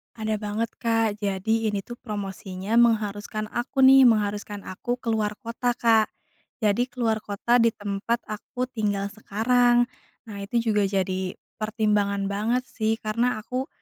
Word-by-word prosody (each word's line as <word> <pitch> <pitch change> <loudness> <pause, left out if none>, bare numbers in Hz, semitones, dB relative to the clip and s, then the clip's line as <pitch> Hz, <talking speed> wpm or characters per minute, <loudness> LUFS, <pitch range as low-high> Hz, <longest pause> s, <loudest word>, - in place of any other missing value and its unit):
Ada 220 -1 -2
banget, 215 +2 -2
Kak. 225 -2 +1
Jadi, 215 +2 0
ini 205 -2 -1
tuh 240 +3 -9
promosinya 195 -1 -4
mengharuskan 215 -2 +1
aku 255 +2 0
nih, 265 -1 +9
mengharuskan 205 -2 0
aku 240 +6 -3
ke 230 - -1
luar 210 -1 0
kota, 240 +1 -2
Kak. 225 -2 +4 0.6
Jadi, 215 +4 +2
ke - - -30
luar 220 -1 +2
kota 220 +4 +1
di 230 - +5
tempat 205 +4 -2
aku 225 +4 -5
tinggal 205 -4 -1
sekarang. 240 +4 +3 0.5
Nah, 200 - -7
itu 230 +2 0
juga 205 -2 +2
jadi 190 -1 -1 0.2
pertimbangan 210 -2 0
banget, 230 +5 0
sih. 220 0 0
Karena 230 +2 0
aku 255 +3 -3
215 Hz, 150 wpm, -25 LUFS, 205-235 Hz, 0.6 s, nih